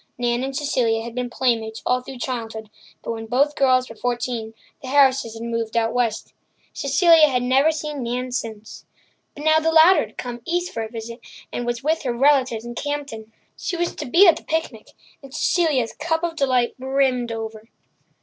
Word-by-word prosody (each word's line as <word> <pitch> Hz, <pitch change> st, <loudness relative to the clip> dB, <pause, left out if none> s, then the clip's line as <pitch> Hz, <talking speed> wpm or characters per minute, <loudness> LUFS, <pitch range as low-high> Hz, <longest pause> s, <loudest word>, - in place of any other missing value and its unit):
Nan 240 Hz, 0 st, 0 dB
and 270 Hz, 0 st, -4 dB
Cecilia 240 Hz, -6 st, 0 dB
had 235 Hz, 0 st, -7 dB
been 250 Hz, 0 st, -3 dB
playmates 225 Hz, -3 st, -1 dB
all 250 Hz, 0 st, +1 dB
through 260 Hz, +1 st, -9 dB
childhood, 225 Hz, -4 st, -5 dB, 0.3 s
but -, -, -4 dB
when 225 Hz, -1 st, -6 dB
both 280 Hz, +5 st, +1 dB
girls 255 Hz, -2 st, +3 dB
were 225 Hz, -, -11 dB
fourteen 240 Hz, -1 st, -3 dB, 0.3 s
the 265 Hz, -, -8 dB
Harrises 265 Hz, -4 st, +3 dB
had 225 Hz, -, -7 dB
moved 230 Hz, -1 st, -3 dB
out 225 Hz, -1 st, +1 dB
west. 240 Hz, -3 st, -1 dB, 0.4 s
Cecilia 315 Hz, +3 st, +5 dB
had 250 Hz, -2 st, 0 dB
never 265 Hz, +5 st, +3 dB
seen 300 Hz, -2 st, -5 dB
Nan 250 Hz, +1 st, -3 dB
since. 220 Hz, -3 st, -6 dB, 0.5 s
But 290 Hz, -, -8 dB
now 315 Hz, 0 st, +5 dB
the 325 Hz, +1 st, +1 dB
latter 325 Hz, +4 st, +6 dB
had -, -, -23 dB
come 245 Hz, -1 st, -6 dB
east 350 Hz, +4 st, -2 dB
for 225 Hz, -, -3 dB
a 220 Hz, -, -5 dB
visit, 230 Hz, +1 st, -8 dB, 0.3 s
and 240 Hz, -, -3 dB
was 240 Hz, +1 st, -3 dB
with 315 Hz, +2 st, +1 dB
her 250 Hz, -3 st, -2 dB
relatives 255 Hz, -3 st, +2 dB
in 240 Hz, -, -6 dB
Campden. 275 Hz, -5 st, -5 dB, 0.2 s
She 360 Hz, -, -4 dB
was 345 Hz, 0 st, -1 dB
to -, -, -5 dB
be 350 Hz, +10 st, +6 dB
at 330 Hz, -2 st, +6 dB
the -, -, -11 dB
picnic, 315 Hz, -9 st, -3 dB, 0.3 s
and 275 Hz, -2 st, -13 dB
Cecilia's 295 Hz, -10 st, +1 dB
cup 320 Hz, +1 st, -2 dB
of 340 Hz, -1 st, -2 dB
delight 255 Hz, -5 st, +1 dB
brimmed 260 Hz, -2 st, 0 dB
over. 225 Hz, -1 st, -5 dB
Mrs. 220 Hz, -, -24 dB
250 Hz, 195 wpm, -22 LUFS, 230-290 Hz, 0.5 s, latter